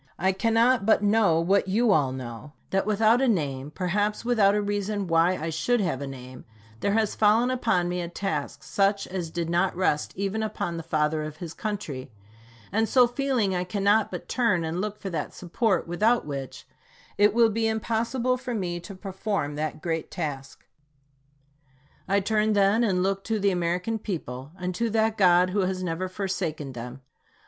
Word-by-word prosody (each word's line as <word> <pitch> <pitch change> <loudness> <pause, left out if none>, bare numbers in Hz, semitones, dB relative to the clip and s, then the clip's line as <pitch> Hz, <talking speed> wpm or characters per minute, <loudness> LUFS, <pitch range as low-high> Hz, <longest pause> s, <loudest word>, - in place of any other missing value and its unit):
I 190 +3 +2
cannot 230 +4 +2
but 220 0 +3
know 205 -6 +3
what 190 +4 +2
you 220 +4 +2
all 145 -8 +3
know, 130 +2 -7 0.2
that 195 +1 +1
without 220 +3 +3
a 270 - +3
name, 145 - -1
perhaps 205 +7 -1
without 210 -5 +4
a 210 - +1
reason 205 0 -2
why 170 +2 +3
I 160 +1 -3
should 240 +10 +1
have 175 -9 -1
a 140 - -4
name, 130 -1 -9 0.4
there 200 - 0
has 220 -1 +1
fallen 220 +4 +3
upon 220 -8 +1
me 180 0 -2
a 170 - -4
task 165 -6 -4
such 200 0 +1
as 180 -3 -4
did 170 0 -3
not 175 +3 +1
rest 170 -5 0
even 200 +3 -2
upon 175 -5 -3
the - - -4
Father 155 -1 0
of 155 0 -6
his 165 -1 -7
Country; 165 - -5 0.6
and 220 +3 +1
so 250 -2 +6
feeling, 245 -5 0
I 180 0 0
cannot 205 +3 +2
but 180 - -7
turn 225 -9 +1
and 165 +3 -2
look 210 0 -3
for 195 - -6
that 165 - -4
support 190 +3 0
without 215 +8 +2
which 140 -3 -6 0.5
it 205 +1 +6
will 230 -1 +4
be 225 +1 0
impossible 230 +3 0
for 250 -1 -5
me 175 -4 -2
to 195 +3 -10
perform 190 -5 -3
that 155 0 -4
great 165 -2 -2
task. 140 -5 -6 1.4
I 200 +1 +2
turn, 215 +1 +1
then, 205 +3 +3
and 185 -5 +1
look 195 0 -1
to 225 - 0
the 200 -1 +2
American 180 +5 -1
people, 145 - -5
and 180 0 -3
to 235 +5 -1
that 220 0 +1
God 180 -2 +4
who 205 - 0
has 185 -1 -1
never 180 +1 -2
forsaken 180 -7 -3
them. 125 +2 -8
190 Hz, 185 wpm, -26 LUFS, 165-215 Hz, 1.4 s, so